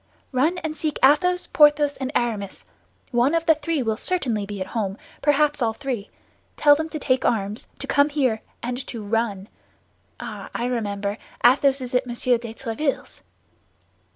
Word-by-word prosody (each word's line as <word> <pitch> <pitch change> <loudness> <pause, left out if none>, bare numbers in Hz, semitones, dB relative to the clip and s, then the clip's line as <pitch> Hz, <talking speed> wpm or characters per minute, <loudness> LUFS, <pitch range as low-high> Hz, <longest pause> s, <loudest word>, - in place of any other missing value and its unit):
"Run 295 +7 +2
and 315 -1 -3
seek 310 -2 -2
Athos, 360 +6 +4
Porthos 295 -1 +4
and 265 0 -3
Aramis. 215 -5 -2 0.5
One 250 +6 +3
of 330 0 0
the 320 - +6
three 310 -2 -2
will 220 -2 -1
certainly 240 - -1
be 205 -1 -6
at 185 - -2
home, 205 -4 -2 0.2
perhaps 295 0 +2
all 225 -2 +1
three. 245 -4 -4 0.5
Tell 290 -1 +7
them 315 +2 -1
to 315 - -4
take 260 -3 +1
arms, 210 -1 0
to - - -5
come 285 +1 +3
here, 260 -7 0 0.2
and 245 +2 -3
to 230 -3 -6
run! 205 -2 -1 0.7
Ah, - - -7
I 240 - -1
remember, 205 -4 -2 0.3
Athos 270 +2 +5
is 250 -1 -6
at 250 0 +1
Monsieur 240 0 +1
de 230 -1 -7
Tréville's." 265 +4 -3
255 Hz, 165 wpm, -23 LUFS, 225-295 Hz, 0.7 s, Tell